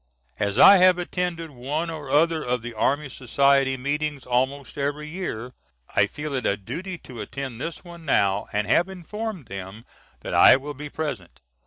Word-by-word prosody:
As 100 0 -1
I 195 +8 +9
have 185 0 +6
attended 175 -2 -3
one 145 +6 -3
or 150 -4 -7
other 160 +2 +3
of 125 -1 -1
the 120 0 -6
Army 140 +7 0
Society 135 +1 +2
meetings 145 +1 -2
almost 130 +2 -1
every 145 +1 -2
year, 140 -8 -5 0.4
I - - +4
feel 150 -1 -6
it 130 -2 -1
a 100 - +1
duty 170 - -6
to 125 -8 -10
attend 130 +2 -6
this 165 - -5
one 170 -2 -12
now 100 -9 +1
and 105 0 0
have 170 - +2
informed 190 - -6
them 100 +2 -8 0.4
that - - -5
I - - +8
will 145 +2 -7
be 150 +2 -8
present. 120 - -5
140 Hz, 175 wpm, -24 LUFS, 125-165 Hz, 0.4 s, I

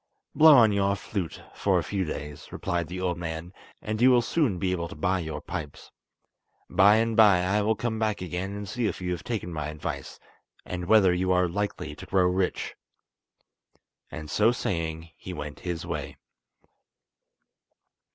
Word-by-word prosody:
"Blow 155 -1 +8
on 110 -3 +6
your 100 0 +2
flute 95 -3 -5
for - - +1
a - - 0
few 95 -2 -2
days," 75 -1 -7
replied 85 -3 -2
the 90 +3 -6
old 90 -2 -1
man, 85 +1 -5 0.3
"and 110 +1 -3
you 130 - +7
will 125 -2 +5
soon 125 - +1
be 90 +1 0
able 85 -2 -2
to - - -10
buy 90 +5 0
your 80 -3 -4
pipes. 75 -2 -7 0.8
By 100 +2 +5
and 115 0 +1
by 105 -5 +6
I 100 +3 +1
will 110 +2 +2
come 110 0 -2
back 110 -2 0
again 90 +2 -4
and 105 0 -6
see 120 +2 -1
if - - -3
you 90 -1 -3
have 90 - -4
taken 105 -7 -4
my 75 -2 -3
advice, 75 0 -6 0.5
and 90 -1 -4
whether 95 -2 +5
you 90 +1 0
are 90 0 +3
likely 90 -4 -3
to 75 - -11
grow 95 -1 +3
rich." 90 +1 0 1.4
And 75 -1 -7
so 105 +9 +3
saying 85 -7 -3
he 90 - -8
went 75 -2 -7
his 85 -2 -4
way. - - -5
90 Hz, 175 wpm, -27 LUFS, 85-105 Hz, 1.4 s, Blow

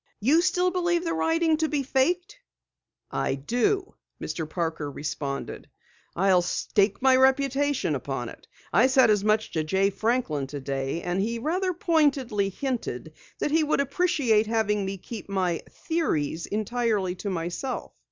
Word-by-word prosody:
"You 280 +11 +4
still 360 0 +2
believe 345 -1 +1
the 330 -1 -1
writing 325 -1 +2
to 315 0 0
be 290 -2 0
faked?" 355 - 0 0.7
"I - - 0
do," 245 - 0 0.3
Mr. 160 -2 -4
Parker 160 -3 -2
responded. 140 -1 -5 0.5
"I'll 185 0 +4
stake 195 +4 0
my 265 -1 +6
reputation 270 - +2
upon 135 -3 -3
it! - - -14 0.3
I 235 +5 +6
said 260 -4 +5
as 205 -2 +2
much 215 +1 +1
to 160 - -1
Jay 190 +5 +1
Franklin 200 - -1
today 135 +2 -3
and 180 +2 -1
he 230 +3 -1
rather 360 +9 0
pointedly 290 - +1
hinted 255 +4 -4 0.2
that 295 - -1
he 320 +1 +3
would 300 - +1
appreciate 280 -7 +2
having 210 -3 +1
me 195 0 -4
keep 215 +2 -9
my 185 -4 0
theories 170 - -2
entirely 215 -3 0
to 200 +2 -4
myself." 175 +8 -4
225 Hz, 145 wpm, -26 LUFS, 180-295 Hz, 0.7 s, my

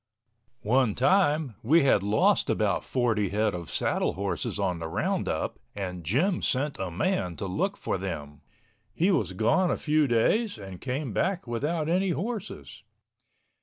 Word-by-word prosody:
One 120 0 +2
time 150 - +2
we 150 +7 +4
had 130 -7 +4
lost 105 +2 +2
about - - +1
forty 115 -6 0
head 105 +2 +1
of 85 -2 -6
saddle - - 0
horses - - -3
on 90 -2 -1
the 80 - -4
roundup 80 - -2 0.2
and 90 -3 -5
Jim 150 - +1
sent 140 +3 0
a 95 -1 -2
man 90 - -1
to 100 - -5
look 190 - -1
for 95 - -2
them. 75 -6 -6 0.5
He 180 +5 +3
was 105 - 0
gone 175 - +2
a - - 0
few 155 -1 +2
days 160 - +2
and 95 -3 -9
came 130 -2 -3
back 185 - 0
without 150 +7 -2
any 185 +3 +1
horses. 210 +4 -5
125 Hz, 155 wpm, -27 LUFS, -, 0.5 s, we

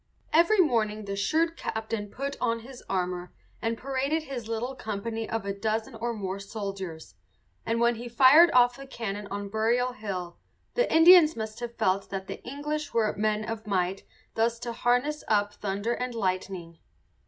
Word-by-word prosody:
Every 340 +7 +5
morning 220 - +2
the 200 0 -3
shrewd 325 +12 +1
captain 220 -5 -3
put 275 +6 -4
on 230 -2 0
his 250 +2 -12
armour 180 -1 -2 0.3
and 225 0 -1
paraded 275 +5 -1
his 255 -6 -6
little 230 +3 -2
company 225 -1 -4
of 225 -3 -2
a 200 - -1
dozen 220 +3 -2
or 230 +1 -3
more 195 -3 -4
soldiers; 195 -5 -6 0.5
and 230 +1 +1
when 235 0 +4
he 240 +1 -7
fired 270 +8 +7
off 245 0 +5
the 275 0 -10
cannon 210 -5 -5
on 200 0 -4
Burial 235 +4 +1
Hill 185 -6 -5 0.3
the - - +1
Indians 325 -1 +8
must 220 0 -5
have 240 -1 -6
felt 195 -3 0
that 190 -1 -4
the - - -8
English 290 +2 -4
were 220 -2 +2
men 215 0 0
of 225 -1 -5
might 190 -1 0 0.3
thus 230 +1 +1
to 240 -1 -4
harness 250 +6 +1
up 205 -1 +2
thunder 205 +4 -2
and 250 0 -3
lightning. 185 -4 -3
225 Hz, 170 wpm, -28 LUFS, 200-250 Hz, 0.5 s, Indians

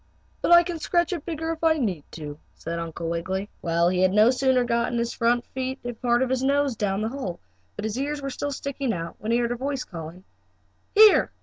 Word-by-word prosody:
"But - - +1
I 345 0 +9
can 340 -1 -5
scratch 345 +3 +1
it 335 -5 -6
bigger 325 -1 -3
if 330 0 -6
I 320 -1 +4
need 190 - -1
to," 150 -2 -7 0.2
said 170 +1 -5
Uncle 165 0 -5
Wiggily. 185 +4 -3
Well, 170 0 +2
he 180 0 +1
had 185 0 +3
no 215 +3 +6
sooner 260 -1 +2
gotten 235 0 0
his 235 0 -1
front 240 +1 +1
feet 260 0 -4
and 240 -2 -6
part 240 0 +3
of 260 - -2
his 260 -1 +1
nose 280 -1 +1
down 200 -1 -1
the 220 - -1
hole, 230 -10 -5 0.4
but 210 - -5
his 220 +3 -2
ears 290 +2 -2
were 275 -1 -4
still 285 +3 -3
sticking 275 -3 -3
out, 165 -2 -5
when 215 +2 -3
he 235 - +4
heard 240 0 0
a - - 0
voice 270 +1 -3
calling: 170 +1 -9 0.7
"Here! 430 0 +7
240 Hz, 230 wpm, -25 LUFS, 185-280 Hz, 0.7 s, I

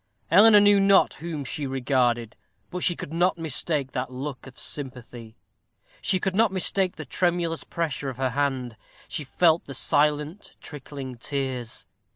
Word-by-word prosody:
Eleanor 210 +4 +8
knew 205 0 +5
not 195 0 +4
whom 155 -4 -6
she 140 +2 -3
regarded, 125 -3 0 0.4
but 180 - -4
she 175 - +2
could 155 - -8
not 175 +2 +2
mistake 150 -3 -1
that 125 +1 -4
look 135 +1 -6
of 130 - -14
sympathy; 125 -5 -5 0.6
she 185 - +1
could 190 +1 -1
not 220 -1 +3
mistake 190 0 +1
the - - -7
tremulous 175 -2 -1
pressure 150 -4 -3
of 130 - -8
her 130 -1 -1
hand; 130 -4 -2 0.3
she 150 - -4
felt 160 +4 +2
the 140 - -8
silent 150 +7 0
trickling 135 -3 -8
tears. 130 -3 -4
145 Hz, 155 wpm, -25 LUFS, 130-175 Hz, 0.6 s, Eleanor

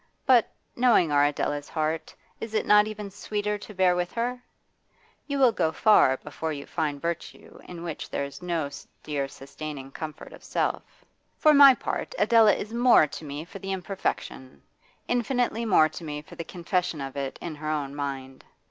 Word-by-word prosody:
But, 245 -4 +4 0.2
knowing 235 -10 +4
our 145 0 +4
Adela's 145 0 -2
heart, 155 0 -2 0.2
is 225 -1 -6
it - - +1
not 210 0 +6
even 210 -2 -6
sweeter 210 +1 -3
to 210 - -10
bear 180 -1 +3
with 180 0 -2
her? 245 +1 -2 0.9
You 280 -1 -2
will 260 -3 +5
go 160 -7 0
far 185 -12 +4
before 155 +3 -5
you 140 -2 -6
find 150 -4 -2
virtue 170 +2 -6
in 170 -1 -9
which 165 -3 -6
there - - -2
is 140 +5 -10
no 165 -5 -2 0.3
dear 145 -2 -2
sustaining 135 0 -8
comfort 155 +1 -8
of - - -14
self. - - -3 0.3
For 305 -1 +5
my 280 -2 +9
part, - - -4
Adela 225 -2 +5
is 215 +2 -6
more 240 -8 +6
to 150 - -9
me 145 +1 -6
for 195 - -10
the 195 +1 -5
imperfection, 185 -8 -4 0.4
infinitely 245 -1 0
more 180 -7 +5
to 160 +3 -9
me 150 -1 -5
for - - -15
the 165 - -6
confession 180 -2 -2
of 135 -1 -6
it 135 -1 -4
in 170 - -5
her 155 0 -5
own 145 -3 -2
mind. 135 -2 -5
170 Hz, 180 wpm, -26 LUFS, 145-215 Hz, 0.9 s, my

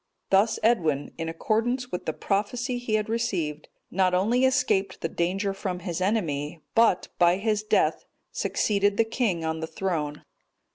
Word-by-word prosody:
Thus 210 +3 +4
Edwin, 160 -11 +2
in 165 0 -2
accordance 240 +8 -1
with 180 - -5
the - - +2
prophecy 240 - -1
he 235 -3 -1
had 215 -1 0
received, 185 -10 -2 0.2
not 185 0 +2
only 235 +8 +3
escaped 215 -8 +1
the - - 0
danger 190 +4 -1
from 185 -2 -4
his 175 -1 -4
enemy, 165 -7 -1
but, 225 -5 +3
by 175 0 +5
his 210 +1 0
death, 215 - +1 0.3
succeeded 205 -1 +1
the 230 - +5
king 215 -8 -1
on 160 0 -2
the 160 - -4
throne. 155 -6 -3
195 Hz, 155 wpm, -26 LUFS, 170-225 Hz, 0.3 s, by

